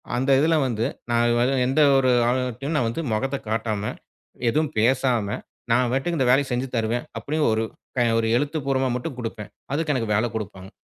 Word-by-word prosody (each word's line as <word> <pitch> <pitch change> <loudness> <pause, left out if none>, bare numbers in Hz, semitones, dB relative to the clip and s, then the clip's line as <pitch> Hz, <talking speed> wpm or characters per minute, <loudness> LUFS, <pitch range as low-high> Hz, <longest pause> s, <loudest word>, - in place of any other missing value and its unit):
அந்த 130 +3 0
இதுல 160 +3 +3
வந்து 115 -2 -1 0.3
நான் 120 +3 +2
எந்த 135 +4 +2 0.2
ஒரு 130 -1 +3 0.2
ஆளுங்கிட்டயும் 125 +4 -1
நான் 120 -6 +2
வந்து 115 - -3
மொகத்தை 135 +5 -1
காட்டாம, 110 -2 -1 0.7
எதுவும் 155 +4 0
பேசாம 120 -1 +2 0.4
நான் 125 +1 +3
பாட்டுக்கு 150 +6 -1
இந்த 130 -3 +2
வேலையை 135 +2 +4
செஞ்சு 125 +2 -1
தருவேன் 115 +1 -1
அப்படின்னு 150 +7 0
ஒரு, 110 +1 +1 0.6
ஒரு 115 - 0
எழுத்துப்பூர்வமா 135 -2 0
மட்டும் 130 +1 -6
கொடுப்பேன். 110 -3 -6 0.2
அதுக்கு 150 0 0
எனக்கு 115 -4 -1
வேலை 110 +4 +2
குடுப்பாங்க. 95 -3 -6
125 Hz, 160 wpm, -24 LUFS, 115-135 Hz, 0.7 s, வேலையை